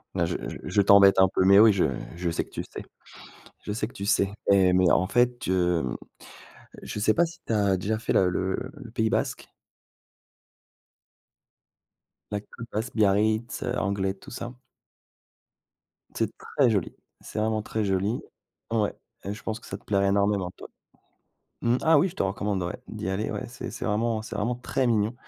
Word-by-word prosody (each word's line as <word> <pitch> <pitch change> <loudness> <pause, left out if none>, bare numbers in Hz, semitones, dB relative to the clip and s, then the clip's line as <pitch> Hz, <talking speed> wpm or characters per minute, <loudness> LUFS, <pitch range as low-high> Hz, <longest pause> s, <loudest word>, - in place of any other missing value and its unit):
Non, - - +2
je - - -2 0.3
je 100 - +2
t'embête 100 -1 +7
un 95 - +7
peu, 95 - +1
mais 100 +1 +7
oui 110 0 +8
je 95 - +2 0.3
je 85 0 -2
sais 85 - -1
que - - -22
tu - - -5
sais. - - -9 0.8
Je - - -3
sais 105 - -2
que - - -13
tu 100 - -6
sais, 100 -1 +2 0.2
mais- 95 -2 +5
mais 90 -1 +4
en 95 - +3
fait, 120 +2 +1
heu, 90 -3 +2 1.0
je - - -5
sais 110 +1 +3
pas 170 - +3
si 170 - -10
tu 115 - -1
as 100 -3 +2
déjà 110 +4 -2
fait 115 - -1
la 95 - +4
le 95 +1 0 0.2
le 135 -7 -11
pays 110 -1 0
basque? - - -2 2.8
La 105 -1 -2
côte 115 +2 -11
basque. 110 +4 -3
Biarritz, 110 +4 +1
Anglet, 100 -3 0
tout 95 - -14
ça. 120 +1 -7 1.6
C'est - - 0
très 135 -4 +1
joli, 100 -6 -1 0.3
c'est - - -6
vraiment 110 0 0
très 110 +1 -2
joli! 100 +4 0 0.5
Ouais, 110 -3 +1 0.3
je 100 +2 -5
pense 110 0 -3
que - - -15
ça 95 - -5
te - - -24
plaîrait 100 -1 +1
énormément, 100 -2 +1
toi - - -12 0.9
mmh, 120 +1 +3
ah 160 -1 +5
oui, 180 - +3
je 175 - -11
te - - -1
recommande 100 0 -1
ouais, 85 - -4
d'y - - -5
aller. 95 +3 -1
Ouais, 105 - -4
c'est 120 0 -7
c'est 120 - -7
vraiment 110 0 0
c'est 110 - -6
vraiment 115 +4 -1
très 125 +1 -1
mignon, 110 -1 +1
105 Hz, 185 wpm, -26 LUFS, 95-115 Hz, 2.8 s, oui